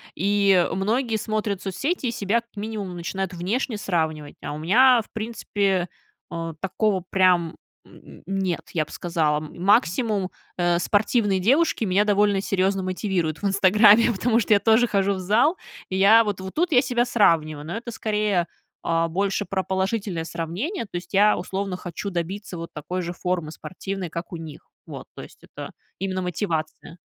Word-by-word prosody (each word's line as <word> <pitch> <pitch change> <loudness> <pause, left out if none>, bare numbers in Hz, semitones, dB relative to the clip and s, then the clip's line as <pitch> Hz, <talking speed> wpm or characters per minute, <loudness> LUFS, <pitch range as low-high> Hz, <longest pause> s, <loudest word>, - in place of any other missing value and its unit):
И 195 -1 +3
многие 225 +5 0
смотрят 210 -2 -2
соцсети, 270 - -2
и - - 0
себя, 225 +1 0
как 235 - -37
минимум, 205 -4 -5
начинают 185 +2 -4
внешне 210 +6 -2
сравнивать. 160 -6 -2
А - - -4
у 150 - -5
меня, 235 +9 +5
в - - -17
принципе, 205 -4 -1 0.4
о, 165 -1 -5
такого 190 -1 0
прям, 180 -3 +3 0.3
м, - - -16
нет, 190 -2 -1
я 160 -3 +1
б - - -15
сказала. 160 -4 0
Максимум, 195 - +1 0.3
э, 175 -1 +2
спортивные 205 0 +1
девушки 265 - +2
меня 195 +2 +3
довольно 205 -1 +2
серьезно 195 0 0
мотивируют 185 -4 -2
в - - -4
"Инстаграме", 210 +4 +5
потому 230 +3 +1
что 210 - +3
я 200 - +5
тоже 225 +3 +4
хожу 200 -1 +1
в 190 - -4
зал. 230 - +2 0.3
И 190 - -3
я, 220 +4 +7
вот 200 -2 -3
вот 190 0 -7
тут 335 0 +1
я 250 - +6
себя 240 0 0
сравниваю, 155 -10 +2
но 175 +7 -4
это, 235 0 -7
скорее, 210 -5 0 0.4
а, 165 0 +2
больше 195 +3 -1
про 190 -1 -2
положительное 190 -3 -2
сравнение, 195 - -4
то 190 - -13
есть 175 - -9
я, 210 +2 +5
условно, 190 +1 -3
хочу 180 +3 -6
добиться 180 +2 -4
вот 165 0 -7
такой 180 +5 -4
же 175 0 -4
формы 180 -3 -2
спортивной, 185 +1 -6
как 170 +5 -6
у - - -5
них. 160 -3 -9 0.2
Вот, - - -9
то - - -8
есть - - -15
это - - -9 0.3
именно 185 0 -2
мотивация. 165 -3 -4
195 Hz, 170 wpm, -24 LUFS, 175-215 Hz, 0.4 s, я